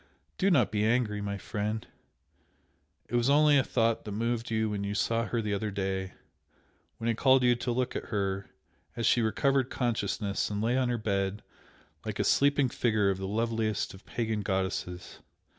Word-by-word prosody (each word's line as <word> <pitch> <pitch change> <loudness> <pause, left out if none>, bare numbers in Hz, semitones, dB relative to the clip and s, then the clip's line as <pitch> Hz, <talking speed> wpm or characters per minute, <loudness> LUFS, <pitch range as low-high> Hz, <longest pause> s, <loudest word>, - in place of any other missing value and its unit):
Do 195 - +3
not 130 - +3
be 105 -1 0
angry, 110 -2 +1
my 100 0 -3
friend! 105 +2 -3 1.2
it - - -14
was 120 +2 +2
only 145 0 +5
a - - +3
thought 115 -2 +1
that 105 - -6
moved 115 +2 -2
you 110 -1 +1
when 105 -1 -3
you 100 +1 -3
saw 115 +1 +1
her 115 -2 -1
the 105 -1 -1
other 105 +2 -1
day 95 -1 -3 0.8
when 115 - -4
I 115 - +3
called 130 +2 +4
you 125 -1 +5
to 120 0 -2
look 125 +1 -1
at - - -3
her 100 -2 -2 0.5
as 115 - -2
she 120 - +4
recovered 135 +4 +1
consciousness 105 -4 -1
and 105 -1 -3
lay 115 +3 +1
on 130 -1 +1
her 120 - 0
bed 100 -2 -1 0.6
like - - -4
a - - +1
sleeping 140 -1 +3
figure 110 -5 +1
of 95 - -4
the 95 - -3
loveliest 110 0 -1
of 95 - -13
pagan 110 -3 -2
goddesses! 95 -2 -3
110 Hz, 185 wpm, -29 LUFS, 100-120 Hz, 1.2 s, only